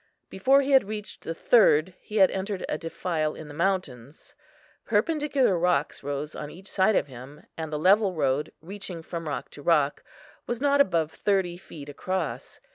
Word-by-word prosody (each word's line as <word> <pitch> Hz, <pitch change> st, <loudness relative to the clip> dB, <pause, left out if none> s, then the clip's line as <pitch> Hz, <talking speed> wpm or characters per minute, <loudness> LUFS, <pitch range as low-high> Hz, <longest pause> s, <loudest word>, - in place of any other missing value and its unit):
Before 270 Hz, +9 st, +4 dB
he 280 Hz, +1 st, -2 dB
had 265 Hz, -5 st, +6 dB
reached 210 Hz, -1 st, -6 dB
the 165 Hz, -, -4 dB
third 185 Hz, -6 st, +4 dB
he 215 Hz, -, -10 dB
had 190 Hz, -2 st, +6 dB
entered 195 Hz, 0 st, -3 dB
a -, -, -1 dB
defile 160 Hz, -1 st, -2 dB
in 155 Hz, -, -9 dB
the 145 Hz, -, -10 dB
mountains. 155 Hz, -7 st, -3 dB, 0.5 s
Perpendicular 265 Hz, -, +1 dB
rocks 165 Hz, -4 st, +1 dB
rose 145 Hz, +2 st, -4 dB
on 150 Hz, -, -6 dB
each 185 Hz, +5 st, -12 dB
side 195 Hz, +2 st, +3 dB
of -, -, +2 dB
him, 135 Hz, +2 st, -12 dB
and 160 Hz, -1 st, -5 dB
the 150 Hz, -, -1 dB
level 190 Hz, +4 st, +4 dB
road, 150 Hz, 0 st, 0 dB
reaching 180 Hz, -1 st, -7 dB
from 165 Hz, -1 st, -6 dB
rock 145 Hz, -, -4 dB
to 145 Hz, -, -11 dB
rock, 150 Hz, -2 st, +2 dB, 0.5 s
was 240 Hz, -, -2 dB
not 285 Hz, +1 st, +4 dB
above 165 Hz, -, +1 dB
thirty 190 Hz, -4 st, 0 dB
feet 155 Hz, -5 st, -11 dB
across. 185 Hz, +6 st, -4 dB
175 Hz, 175 wpm, -26 LUFS, 150-205 Hz, 0.5 s, had